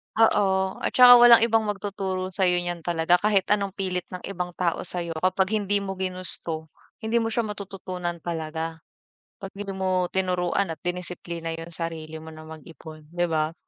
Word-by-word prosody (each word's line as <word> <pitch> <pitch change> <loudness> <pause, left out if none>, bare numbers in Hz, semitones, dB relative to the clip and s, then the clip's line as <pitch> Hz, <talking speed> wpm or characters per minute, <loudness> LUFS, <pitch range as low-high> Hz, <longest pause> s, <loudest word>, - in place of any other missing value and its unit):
Oo, 190 -4 +3
at - - -3
tsaka 245 -1 +10
walang 240 -1 +8
ibang 225 -1 +3
magtuturo 195 -2 -3
sa'yo 180 -2 +2
niyan 175 -2 -5
talaga. 175 0 +3
Kahit 200 -1 +1
anong 200 -2 +1
pilit 185 -3 -3
ng 180 - -6
ibang 180 -2 -4
tao 170 -1 -1
sa'yo 175 -1 -4
kapag 185 +3 +1
hindi 205 -1 +1
mo 195 -1 -5
ginusto, 180 -4 -5 0.3
hindi 220 +2 0
mo 225 -1 0
siya 235 - +2
matututunan 190 -5 -5
talaga. 160 -1 -4 0.6
'Pag 195 -3 -9
hindi 200 0 -6
mo 185 -2 0
tinuruan 180 -1 0
at - - -33
dinisiplina 170 -2 -4
yung 165 +1 -8
sarili 160 -2 -5
mo 160 0 -11
na 155 - -11
mag-ipon, 155 0 -12
‘di 175 0 +1
ba? 155 0 0
180 Hz, 165 wpm, -25 LUFS, 165-195 Hz, 0.6 s, tsaka